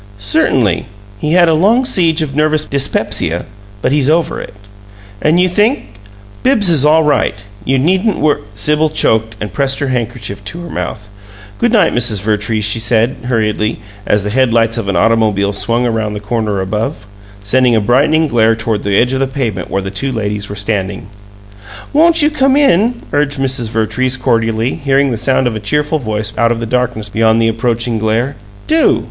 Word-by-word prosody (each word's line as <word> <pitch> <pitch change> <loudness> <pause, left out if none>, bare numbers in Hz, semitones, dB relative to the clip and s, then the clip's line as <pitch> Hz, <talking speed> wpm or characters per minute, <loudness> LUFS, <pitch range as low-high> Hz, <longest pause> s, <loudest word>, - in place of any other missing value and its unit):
"Certainly. 100 - +1 0.3
He 150 +7 -1
had 175 -1 +5
a 165 - +3
long 215 +11 +3
siege 165 -8 +1
of 135 -3 -6
nervous 155 0 +1
dyspepsia, 135 - -1 0.4
but - - +1
he's 145 -1 +2
over 165 +1 0
it." - - -10 0.7
"And 160 +3 +3
you 180 - +4
think 210 +9 0 0.3
" 100 0 -23
"Bibbs 220 -9 +3
is 150 -5 +3
all 155 +2 +4
right. 150 -7 +1 0.3
You 135 +1 +1
needn't 185 - +1
wor 150 -1 +1
" - - -23
Sibyl 150 +9 +1
choked, 110 -7 0
and 105 -3 -6
pressed 135 +4 0
her 140 - -2
handkerchief 115 -5 -4
to 170 +11 -6
her 170 - -9
mouth. 105 -1 -5 0.5
"Good 240 - +2
night, 225 -4 +3
Mrs. 115 -4 +1
Vertrees," 105 0 -1
she 105 +2 0
said, 115 +2 +1
hurriedly, 110 -3 -1 0.3
as 105 -1 +2
the 105 - -3
head 130 +1 +2
lights 115 0 +2
of 100 -3 -4
an 100 - -1
automobile 105 0 +2
swung 115 +4 0
round 110 -3 -2
the - - -4
corner 105 -2 -2
above, 105 +2 -3 0.4
sending 125 +3 +2
a - - +3
brightening 145 +9 +2
glare 115 -5 +2
toward 110 -2 -2
the 100 -1 +1
edge 125 +2 +2
of 130 - -1
the 135 - +1
pavement 120 -9 -3
where 95 - -2
the 95 - -5
two 130 +8 -3
ladies 105 -3 -3
were 100 - -6
standing. 100 -1 -3 0.8
"Won't 325 +1 +4
you 300 - +3
come 270 -2 +2
in?" 240 -3 +2
urged 145 0 0
Mrs. 135 -3 -1
Vertrees, 125 +4 -1
cordially, 115 0 0
hearing 140 0 +2
the - - -1
sound 130 +3 +1
of 120 -2 -1
a - - -3
cheerful 150 +8 -1
voice 110 -3 -3
out 115 0 +3
of 115 - -1
the 115 - -3
darkness 120 -3 -2
beyond 110 +2 +2
the 115 - +2
approaching 115 0 -1
glare. 115 +6 -1 0.3
"Do! 320 +1 +3
120 Hz, 190 wpm, -14 LUFS, 110-150 Hz, 0.8 s, had